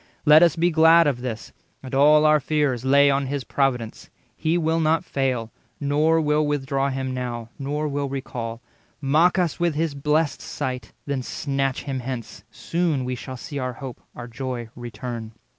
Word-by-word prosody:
Let 150 +1 +8
us 170 -3 +5
be 175 +2 +2
glad 165 +1 +6
of 135 -5 0
this, 115 -4 -6 0.3
and 130 - -9
all 150 +3 +5
our 155 0 +5
fears 145 -4 0
Lay 140 +1 +5
on 135 0 0
his 140 0 -3
providence; 125 -6 -1 0.3
He 160 +2 0
will 165 -1 +1
not 160 +2 +2
fail, 130 -7 -1 0.3
Nor 150 +3 +2
will 150 -1 +2
withdraw 140 -1 0
him 130 -1 -3
now, 120 -2 -4
nor 145 +2 -2
will 140 -1 -2
recall— 120 -4 -5 0.4
Mock 155 +6 +3
us 175 -4 0
with 170 -3 +1
his 160 -1 0
blest 150 +1 0
sight, 125 -1 -5
then 140 -2 -2
snatch 135 0 -2
him 135 -2 -3
hence: 125 -2 -6
Soon 165 -6 -1
we 125 - -2
shall 130 +1 -7
see 145 +3 -6
our 130 -1 -3
hope, 130 -1 -8
our 120 0 -7
joy, 120 -1 -5
return." 120 -1 -6
140 Hz, 175 wpm, -23 LUFS, 125-155 Hz, 0.4 s, Let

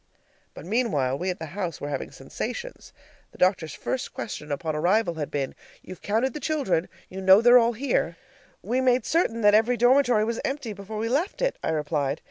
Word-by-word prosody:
But - - -10
meanwhile 180 - 0
we 180 +6 -3
at 180 - -2
the 160 - -6
house 180 -5 -4
were 145 - -5
having 140 -2 -4
sensations. - - -7 0.4
The - - -15
doctor's 180 -5 +1
first 260 - -4
question 150 -8 -6
upon 155 +2 -2
arrival 180 +4 +2
had 155 -3 -4
been: 140 -2 -3 0.3
"You've 185 - -10
counted 230 +5 0
the - - -5
children? 280 - -1 0.2
You 190 +1 -7
know 190 +1 +7
they're 245 +2 +7
all 235 0 +2
here?" 220 -9 -1 0.5
"We've 245 +6 0
made 255 -1 +2
certain 255 -8 +1
that 205 -1 +5
every 225 +3 +3
dormitory 245 -3 +4
was 230 0 -2
empty 270 -5 -3
before 200 +2 -8
we 220 +1 -1
left 295 - -1
it," - - 0
I - - -1
replied. 150 -2 -1
210 Hz, 195 wpm, -25 LUFS, 165-245 Hz, 0.5 s, know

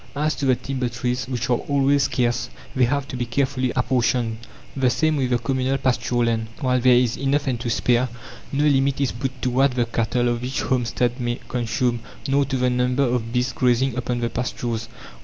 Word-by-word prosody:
As 150 +2 +1
to 140 - -1
the 130 - +5
timber 130 -1 -3
trees, 125 +1 -2
which 125 -2 -2
are 120 - +4
always 140 0 +2
scarce, 120 -1 0 0.3
they 130 -1 +4
have 140 +2 -1
to - - -5
be 120 -1 -2
carefully 130 0 0
apportioned. 125 -3 +1 0.4
The 135 -2 +2
same 155 +5 +1
with 130 -3 0
the 125 - +3
communal 130 +2 0
pasture 120 -2 +1
land; 115 -1 0
while 130 -3 +1
there 125 0 +5
is 120 -1 +2
enough 140 +2 0
and 125 -4 -1
to 120 - -3
spare, 125 +1 +2 0.4
no 145 +1 +1
limit 140 -2 +2
is 140 -3 +1
put 130 +2 -4
to 125 - +1
what 130 +1 +3
the 120 -1 +2
cattle 120 +1 0
of 120 0 -2
each 130 +1 -2
homestead 125 0 0
may 120 0 -1
consume, 120 0 -1 0.3
nor 140 +1 +3
to 135 0 -2
the 125 0 +2
number 125 +2 +1
of 120 -3 -1
beasts 125 +1 0
grazing 125 0 +2
upon 125 -1 -2
the 115 -1 -1
pastures. 120 -1 -3
125 Hz, 205 wpm, -23 LUFS, 120-135 Hz, 0.4 s, the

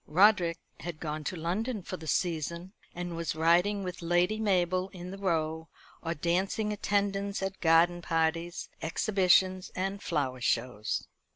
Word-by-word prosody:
Roderick 180 0 +4 0.2
had 170 -3 -6
gone 155 -1 -4
to - - -2
London 195 +7 -2
for 185 - -5
the 160 -3 -9
season, 170 +2 -1 0.2
and 175 -1 -4
was 165 -2 -2
riding 175 +6 +3
with 180 -1 -5
Lady 175 +5 +2
Mabel 185 -3 +1
in 180 -1 -8
the 195 - -7
Row, 160 -3 -1 0.3
or 165 +1 -2
dancing 190 +7 0
attendance 200 -1 0
at 195 0 -4
garden 170 +1 +4
parties, 165 +1 -1
exhibitions, 185 +1 +2
and 195 +2 -2
flower 135 -6 -1
shows. 120 -3 -1
175 Hz, 145 wpm, -30 LUFS, 165-195 Hz, 0.3 s, Roderick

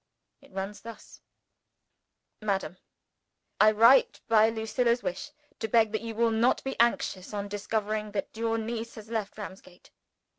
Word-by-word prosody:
It 280 - -20
runs 195 +2 -5
thus: 230 -2 -12 1.2
"MADAM, 195 -3 -2 0.8
I 215 - +7
write, 230 +5 +5
by 220 -1 +5
Lucilla's 235 +2 0
wish, 185 +11 -4 0.3
to 220 - -2
beg 220 0 +3
that 220 - -2
you 225 -1 -6
will 230 0 +2
not 230 +3 +2
be 270 - -3
anxious 210 -4 +1
on 200 0 -3
discovering 210 +1 -2
that 205 - -4
your 225 0 0
niece 230 +1 -4
has 220 0 -11
left 215 -3 -3
Ramsgate. 190 -3 -11
220 Hz, 145 wpm, -28 LUFS, 205-230 Hz, 1.2 s, I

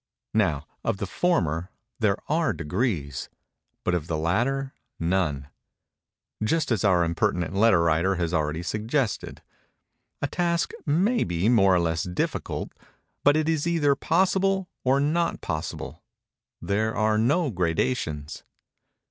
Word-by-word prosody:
Now 80 -10 +1 0.2
of - - 0
the 100 - -3
former, 90 - 0 0.3
there 105 -3 +2
are 160 +1 +1
degrees—but 85 - -4
of 85 -3 -1
the 80 - -1
latter, 125 - 0 0.3
none:—just 95 - -3
as 110 -5 +1
our 90 -4 +4
impertinent 90 +1 0
letter 95 -4 +4
writer 85 +4 +2
has 85 -1 -2
already 80 0 0
suggested. 110 - -2 0.8
A - - -1
task 170 +2 0 0.2
may 190 +12 +2
be 85 +4 0
more 100 -6 +5
or - - +4
less 85 -1 0
difficult; 90 +1 -3 0.5
but 145 +1 +5
it 155 0 0
is 160 -1 0
either 155 -4 +3
possible 190 +5 +1 0.2
or 135 +2 +3
not 160 +4 +1
possible:—there 100 +5 -5
are 110 0 +2
no 145 +6 +2
gradations. 80 - -1
105 Hz, 120 wpm, -26 LUFS, -, 0.8 s, more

